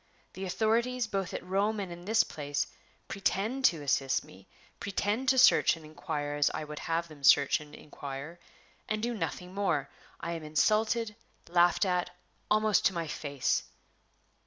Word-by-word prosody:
The 190 - -5
authorities, 230 +6 +1
both 195 -4 -2
at - - -5
Rome 200 +4 0
and 190 -3 -4
in 175 +1 -9
this 220 +2 +4
place, 145 -1 -3 0.4
pretend 205 +6 -1
to 160 -4 +3
assist 135 -1 +1
me, 95 +1 -16 0.3
pretend 205 +5 -1
to 260 - +3
search 250 - +6
and 160 - -13
inquire 155 -1 -4
as 145 0 +3
I - - -3
would 150 0 -7
have 165 +1 -1
them 150 -3 -14
search 140 0 +6
and 150 -1 -12
inquire, 145 +3 -8 0.5
and 215 0 -1
do 240 +1 0
nothing 180 -1 -4
more. 175 -8 0 0.3
I 170 - -4
am 165 -1 -4
insulted, 215 +8 +1 0.3
laughed 175 +1 +4
at, 180 -1 0 0.4
almost 215 -1 +3
to 190 - -3
my 170 -1 -1
face." 145 -3 -1
175 Hz, 160 wpm, -30 LUFS, 150-215 Hz, 0.5 s, search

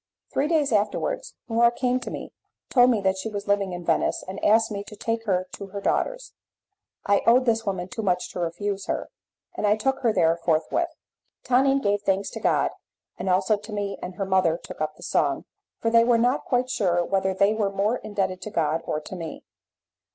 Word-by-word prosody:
Three 285 - +1
days 305 -4 +2
afterwards 225 - -1
Laura 235 +1 +4
came 250 +1 0
to - - -6
me, - - -7 0.4
told 245 -1 +6
me 225 -5 +2
that 190 0 +1
she 220 - -3
was 205 -1 -5
living 200 -2 +1
in 175 -1 -6
Venice, 165 - +1
and 190 +1 -7
asked 225 +1 +4
me 200 -1 -3
to 210 - -10
take 225 +2 -2
her 185 -1 +1
to 200 - -7
her 200 +1 -6
daughter's. - - -1 0.7
I 200 - +3
owed 250 +2 +6
this 225 -2 +1
woman 185 -2 -2
too 225 - -5
much 180 -3 0
to - - -6
refuse 195 +4 -3
her, - - -3 0.4
and 210 - -1
I 205 - +4
took 265 +5 0
her 235 -3 +2
there 165 -5 +3
forthwith. 170 - 0 0.5
Tonine 270 +2 +3
gave 205 0 +1
thanks 195 -1 0
to - - -6
God, - - +2 0.5
and 190 - -2
also 190 +3 +3
to 210 +2 -11
me, 205 -1 -3
and 180 0 -6
her 195 - -2
mother 185 -4 +2
took 170 - -10
up 155 0 -2
the - - -14
song, 140 -2 0 0.3
for 230 - -1
they 230 0 +6
were 235 0 +4
not 245 +4 +1
quite 250 0 0
sure 175 -6 +1
whether 190 -1 0
they 200 +2 +3
were 215 -2 0
more 200 +5 0
indebted 195 -4 -3
to - - -5
God 165 -3 0
or 150 - -1
to 185 - -8
me. 165 -3 -7
205 Hz, 210 wpm, -25 LUFS, 185-230 Hz, 0.7 s, told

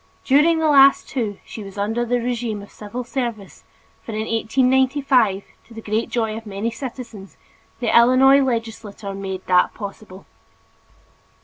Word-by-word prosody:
During 300 +5 +4
the 320 -1 +1
last 275 -2 +5
two 220 -6 -3
she 220 - -9
was 195 0 -11
under 220 +4 -1
the 245 +1 0
regime 235 -3 -3
of 205 - -15
civil 225 +4 -7
service 235 -5 -5 0.4
for 225 - -8
in 215 - -2
1895, 255 -2 +1 0.2
to 230 - -15
the - - -7
great 215 +2 -2
joy 225 -3 -1
of 225 0 -9
many 205 +3 -3
citizens, 230 -4 -9 0.4
the 240 -3 0
Illinois 255 +3 +6
legislature 225 -5 -4
made 190 -1 -6
that 180 -1 +2
possible. 200 -2 -9
230 Hz, 145 wpm, -21 LUFS, 205-255 Hz, 0.4 s, Illinois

